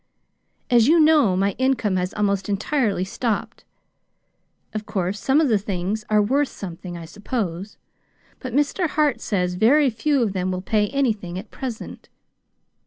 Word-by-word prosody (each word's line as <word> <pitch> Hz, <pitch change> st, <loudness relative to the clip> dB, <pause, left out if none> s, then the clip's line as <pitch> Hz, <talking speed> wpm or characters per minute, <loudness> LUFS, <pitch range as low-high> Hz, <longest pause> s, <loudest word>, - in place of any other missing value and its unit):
As 235 Hz, -1 st, +5 dB
you 330 Hz, +3 st, +5 dB
know, 300 Hz, -12 st, +4 dB
my 200 Hz, +1 st, +2 dB
income 260 Hz, -7 st, +1 dB
has 180 Hz, +1 st, -1 dB
almost 200 Hz, -1 st, 0 dB
entirely 205 Hz, -1 st, 0 dB
stopped. 220 Hz, +2 st, -3 dB, 1.1 s
Of 215 Hz, 0 st, -5 dB
course, 190 Hz, +1 st, -2 dB
some 275 Hz, +3 st, +2 dB
of 315 Hz, -, +3 dB
the 220 Hz, -5 st, +3 dB
things 200 Hz, +2 st, -3 dB
are 210 Hz, -1 st, +4 dB
worth 275 Hz, +7 st, +1 dB
something, 175 Hz, -3 st, -8 dB
I 165 Hz, -, -8 dB
suppose; 200 Hz, 0 st, -4 dB, 0.6 s
but 255 Hz, -, -6 dB
Mr. 295 Hz, +6 st, +1 dB
Hart 300 Hz, -2 st, +1 dB
says 180 Hz, -3 st, -1 dB
very 260 Hz, +8 st, +4 dB
few 270 Hz, +4 st, +1 dB
of 205 Hz, -4 st, -1 dB
them 185 Hz, -1 st, -1 dB
will 185 Hz, 0 st, -4 dB
pay 210 Hz, 0 st, +1 dB
anything 215 Hz, -9 st, -1 dB
at 205 Hz, +4 st, -8 dB
present. 250 Hz, -4 st, -7 dB
215 Hz, 155 wpm, -22 LUFS, 190-265 Hz, 1.1 s, As